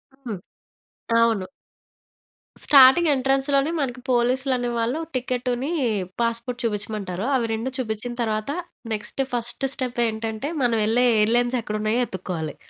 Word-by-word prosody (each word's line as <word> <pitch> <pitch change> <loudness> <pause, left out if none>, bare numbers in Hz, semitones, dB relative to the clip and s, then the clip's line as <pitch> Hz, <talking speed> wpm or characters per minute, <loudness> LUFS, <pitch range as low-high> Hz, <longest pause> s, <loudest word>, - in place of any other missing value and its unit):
హ్మ్. 235 -9 -6 0.8
అవును. 225 -5 +2 1.2
స్టార్టింగ్ 280 +4 +7
ఎంట్రన్స్‌లోనే 275 +3 +1
మనకి 255 -2 -3
పోలీస్‌లు 255 +2 +2
అనే 245 0 -2
వాళ్ళు 240 +7 0 0.2
టికెట్‌ని 250 +3 -1 0.5
పాస్‌పోర్ట్ 235 +2 -2
చూపించమంటారు. 205 -3 -2
అవి 240 -3 +1
2 230 +4 -2
చూపించిన 240 0 -3
తరువాత 215 +3 -1 0.4
నెక్స్ట్ 210 +5 -4
ఫస్ట్ 240 +3 -2
స్టెప్ 250 -3 -4
ఏంటంటే, 220 +4 -3
మనం 240 -2 +2
వెళ్ళే 245 +3 +3
ఎయిర్‌లైన్స్ 240 +3 +2
ఎక్కడ 215 -1 -4
ఉన్నాయో 220 +3 +1
ఎతుక్కోవాలి. 170 -5 -5
240 Hz, 120 wpm, -23 LUFS, 220-260 Hz, 1.2 s, స్టార్టింగ్